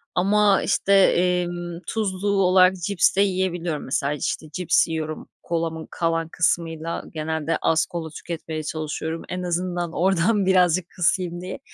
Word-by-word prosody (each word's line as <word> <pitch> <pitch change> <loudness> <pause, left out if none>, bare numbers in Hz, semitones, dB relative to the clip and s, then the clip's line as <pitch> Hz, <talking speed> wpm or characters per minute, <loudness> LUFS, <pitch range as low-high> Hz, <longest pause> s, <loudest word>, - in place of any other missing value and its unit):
ama, 200 +2 +3
işte, 200 - +1
emm, 175 -2 +2
tuzlu 205 -3 -2
olarak 185 -1 +4
cips 180 +1 +1
de 200 - +3
yiyebiliyorum. 175 -5 -1
Mesela, 140 +2 0
işte, 150 +1 -3
cips 180 -2 +2
yiyorum, 155 -1 -5
kolamın 165 -1 -3
kalan 165 -1 -1
kısmıyla. 165 0 -1
Genelde 160 0 -2
az 160 0 +2
kola 165 -2 -6
tüketmeye 160 -1 -6
çalışıyorum. 155 +1 -4
En 180 0 -4
azından 175 -1 -2
oradan 190 +4 +2
birazcık 180 -2 +3
kısayım 175 0 0
diye. 185 +5 -6
175 Hz, 135 wpm, -23 LUFS, 160-185 Hz, -, olarak